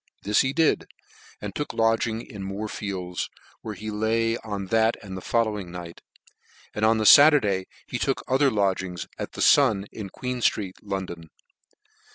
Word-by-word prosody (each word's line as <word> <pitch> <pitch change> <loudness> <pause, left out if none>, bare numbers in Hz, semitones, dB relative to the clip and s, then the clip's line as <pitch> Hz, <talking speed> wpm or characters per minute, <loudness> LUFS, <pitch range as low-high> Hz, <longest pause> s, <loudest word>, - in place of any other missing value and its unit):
This 105 +1 +3
he 130 - 0
did, 160 +2 +2 0.5
and 105 -2 -5
took 150 - -4
lodgings 115 0 +1
in 105 - -9
Moor 95 +3 -4
fields, 95 -4 -4 0.3
where 110 -2 -6
he 110 +2 -6
lay 115 +2 +1
on 100 -4 -5
that 110 0 +3
and 95 -2 -7
the 95 - -6
following 105 -5 -1
night, 85 -1 -9 0.7
and 105 - -3
on 110 +1 +4
the 110 - 0
Saturday 110 -10 +6 0.2
he - - -4
took - - -1
other 135 +2 +3
lodgings 95 -5 -1
at - - -5
the - - -2
Sun 110 -9 +4
in 105 -3 -7
Queen 125 +3 -5
flreet, 100 -5 +1
London. 95 -5 -5
105 Hz, 165 wpm, -25 LUFS, 95-115 Hz, 0.7 s, Saturday